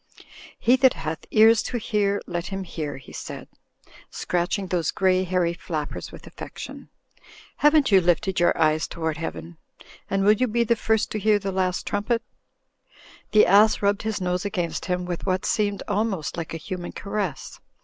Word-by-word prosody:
'Tie 245 - +6
that 260 -1 +4
hath 155 0 -5
ears 220 0 +6
to 245 - -3
hear, 205 -3 0
let 175 -1 -4
him 195 0 -4
hear," 155 -6 -5
he 130 - -13
said, - - -7 0.6
scratching 180 +3 -1
those 175 -4 -1
grey 185 -1 +2
hairy 180 -2 0
flappers 160 -4 -5
with - - -12
affection. - - -9 0.7
"Haven't 295 -4 +4
you 190 -1 +7
lifted 180 +2 +1
your 175 - +4
ears 155 0 +2
toward 160 -2 -3
Heaven? 165 +1 -6 0.5
And 195 0 +1
will 205 - +6
you 250 +4 +1
be 235 +1 +1
the 235 +1 +2
first 220 -1 0
to 215 - -2
hear 210 +1 +3
the 195 -1 -3
Last 185 -1 -1
Trumpet?" 215 +3 -1 1.1
The? 215 - +6
ass 210 +2 +5
rubbed 200 0 +2
his 220 -1 -2
nose 180 -1 -1
against 180 -5 -3
him 180 -1 -1
with 175 +1 -5
what 185 0 0
seemed 205 -2 0
almost 200 -6 -1
like 165 -1 -5
a - - -2
human 175 +2 -6
caress. 200 -8 -4
190 Hz, 170 wpm, -24 LUFS, 175-215 Hz, 1.1 s, you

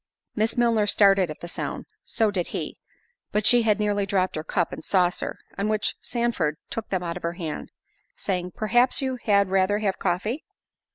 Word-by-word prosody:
Miss 220 +2 0
Milner 230 -3 +3
started 195 -3 +5
at 155 - -8
the 170 - -6
sound—so 215 +4 -3
did 180 -4 0
he—but 215 - -6
she 240 +2 +7
had 215 -2 +2
nearly 205 -1 0
dropped 185 -2 +1
her 155 - -3
cup 175 +1 -1
and - - -7
saucer; 180 -2 +1 0.2
on 205 +2 0
which 215 -1 +1
Sandford 235 -11 -1
took 225 - -4
them 185 -2 -1
out 170 0 -3
of - - -9
her 170 0 -2
hand, 165 -4 -5 0.4
saying, 180 - -3
"Perhaps 240 +4 +2
you 260 -1 -1
had 200 -2 +3
rather 190 +2 +2
have 205 -3 -1
coffee?" 210 - -1
200 Hz, 175 wpm, -25 LUFS, 180-220 Hz, 0.4 s, she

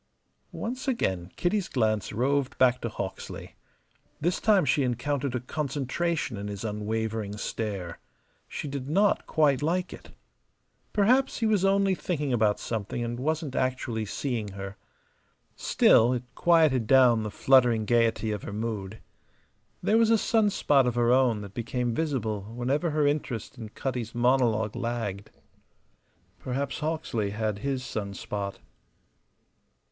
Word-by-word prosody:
Once 255 +4 -4
again 95 - -1
Kitty's 195 +2 0
glance 110 -5 0
roved 135 +4 0
back 125 -1 +4
to 115 - -2
Hawksley. 100 -3 -6 0.7
This 175 +4 0
time 205 -6 +4
she 140 +2 +2
encountered 130 +1 -1
a - - 0
concentration 145 +1 -2
in 100 +1 -5
his 100 0 -6
unwavering 110 0 -3
stare. 100 -6 -4 0.5
She - - -5
did 140 -1 -5
not 200 +6 +2
quite 145 -4 +3
like 180 +4 -1
it. - - -12 0.8
Perhaps 250 +6 +3
he 230 - 0
was 210 -4 +2
only 195 0 +3
thinking 150 -7 -2
about 110 -3 +2
something 110 +1 -3
and 120 +1 -4
wasn't 155 0 -2
actually 125 -3 -1
seeing 110 -2 -3
her. 100 0 -7 0.8
Still, 120 +3 +4
it 125 -1 -2
quieted 155 -9 +3
down 125 -3 +5
the 105 - -3
fluttering 120 -1 +4
gayety 115 -1 +2
of 105 -2 -3
her - - -7
mood. 105 -2 -4 0.9
There 220 +2 +3
was 225 -1 +4
a 225 - +5
sun 220 0 +2
spot 140 -8 +3
of 120 - 0
her 120 0 +3
own 125 -4 +3
that 100 -1 -9
became 120 +1 -2
visible 120 -8 -1
whenever 135 +7 0
her 150 -1 +1
interest 140 -5 -2
in 110 -2 -7
Cutty's 120 -1 -4
monologue 120 -3 +2
lagged. 115 -5 -3 1.1
Perhaps 130 +7 -3
Hawksley 150 -9 -2
had 105 0 -2
his 135 +1 -2
sun 100 -4 -4
spot. 100 -1 -4
125 Hz, 140 wpm, -27 LUFS, 110-150 Hz, 1.1 s, down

